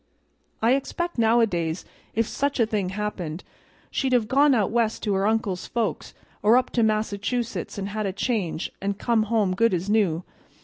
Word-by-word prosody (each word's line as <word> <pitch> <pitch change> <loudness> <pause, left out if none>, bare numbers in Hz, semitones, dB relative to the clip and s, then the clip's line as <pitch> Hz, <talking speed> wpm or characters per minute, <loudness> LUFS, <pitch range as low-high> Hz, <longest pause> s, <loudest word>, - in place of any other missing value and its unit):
"I 235 +3 +5
expect 345 +3 -2
nowadays, 205 -8 +2 0.3
if 225 +1 +2
such 285 -1 -1
a 230 - +5
thing 210 -4 -1
happened, 190 -5 -4 0.5
she'd 265 -1 0
have 235 -4 +3
gone 280 +2 +4
out 210 -4 +1
West 230 -1 0
to 210 - +1
her 195 +1 +1
uncle's 215 -4 -1
folks 235 -2 -2 0.3
or 220 +4 +6
up 255 - 0
to 240 - +1
Massachusetts 220 +2 -1
and 200 0 -3
had 215 0 -2
a - - -1
change, 195 -5 -2
an' 200 +1 -1
come 230 +2 +1
home 210 -5 +2
good 230 0 +3
as 185 +4 -2
new. 185 -6 +2
215 Hz, 175 wpm, -25 LUFS, 195-235 Hz, 0.5 s, or